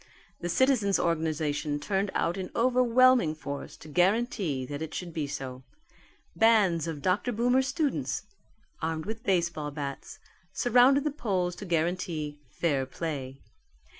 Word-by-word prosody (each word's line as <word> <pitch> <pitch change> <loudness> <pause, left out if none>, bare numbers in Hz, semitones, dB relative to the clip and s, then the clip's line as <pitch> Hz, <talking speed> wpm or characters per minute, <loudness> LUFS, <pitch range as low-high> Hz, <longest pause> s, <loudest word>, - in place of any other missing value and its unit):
The 175 - -4
citizens' 230 -3 +3
organization 155 -3 -1
turned 195 +5 -1
out 170 +1 +1
in 190 -2 -5
overwhelming 250 -6 +4
force 140 -2 -7
to - - -13
guarantee 180 - +1
that 145 +3 -6
it 160 -1 -5
should 175 -2 -5
be 155 -3 -2
so. 130 -2 -6 0.7
Bands 200 -8 +4
of 150 -4 -5
Dr. 195 +7 +1
Boomer's 245 +3 +2
students, 270 - -1 0.6
armed 160 -1 -2
with 220 +1 -5
baseball 170 -8 0
bats, 140 -2 -6 0.4
surrounded 250 +5 +4
the 300 - 0
polls 185 - -1
to 205 - -7
guarantee 165 -3 -1
fair 140 -6 0
play. 135 -3 -5
175 Hz, 135 wpm, -28 LUFS, 150-230 Hz, 0.7 s, overwhelming